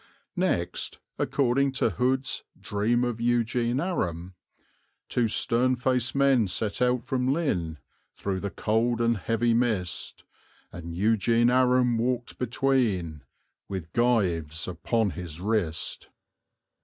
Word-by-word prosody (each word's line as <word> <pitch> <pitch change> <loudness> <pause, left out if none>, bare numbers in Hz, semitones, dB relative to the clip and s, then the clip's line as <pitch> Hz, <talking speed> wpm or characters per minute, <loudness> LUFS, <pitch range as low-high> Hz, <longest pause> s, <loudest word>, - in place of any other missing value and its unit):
Next, 175 - -1 0.2
according 135 0 +1
to 125 -4 +1
Hood's 130 +7 0 0.2
Dream 110 +4 0
of 120 -2 -2
Eugene 120 +1 +1
Aram 90 - -2 0.8
Two 120 -2 +1
stern 120 +3 +2
faced 125 0 0
men 135 -5 +4
set 105 +5 -2
out 125 -1 +2
from 130 0 0
Lynn, 90 - -1 0.4
Through 95 -2 -3
the 100 - -3
cold 115 +4 0
and 115 0 +2
heavy 115 +5 +1
mist, 110 -7 -1 0.5
And 85 -1 -7
Eugene 115 +4 +3
Aram 125 -2 +3
walked 120 0 -2
between, 115 - 0 0.5
With 90 -4 -6
gyves 90 -10 +1
upon 100 +4 0
his 85 -3 -7
wrist. 95 -5 -2
115 Hz, 115 wpm, -27 LUFS, 95-125 Hz, 0.8 s, men